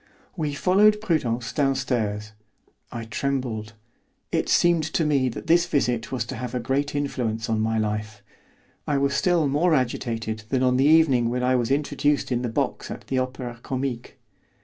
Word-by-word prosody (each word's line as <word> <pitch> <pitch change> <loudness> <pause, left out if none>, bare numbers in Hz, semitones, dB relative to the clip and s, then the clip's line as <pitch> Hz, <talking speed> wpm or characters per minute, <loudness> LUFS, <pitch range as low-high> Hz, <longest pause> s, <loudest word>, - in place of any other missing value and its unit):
We 150 -4 -2
followed 210 +6 +4
Prudence 125 - -1
downstairs. 115 -7 -1 0.6
I 115 -1 -5
trembled; 115 -2 -3 0.6
it - - 0
seemed 170 -2 +4
to 165 - +2
me 140 -4 +2
that 120 - -7
this 170 +1 +4
visit 120 -8 0
was 125 -3 -2
to 130 - -6
have 125 0 -5
a - - 0
great 135 +5 -1
influence 120 -6 -2
on 110 -1 +1
my 110 +1 0
life. 105 -1 -3 0.6
I 145 - +1
was 140 0 +1
still 175 -5 +2
more 155 +4 +2
agitated 115 -4 -2
than 130 -1 +1
on 125 0 +3
the 135 - +3
evening 145 -7 +4
when 125 +1 -1
I 130 +1 +3
was 120 -2 0
introduced 145 0 0
in 120 -1 +1
the 125 - -2
box 110 - -2
at - - -8
the 130 - +1
Opera 130 -2 -4
Comique. 130 -1 -4
130 Hz, 170 wpm, -24 LUFS, 115-145 Hz, 0.6 s, followed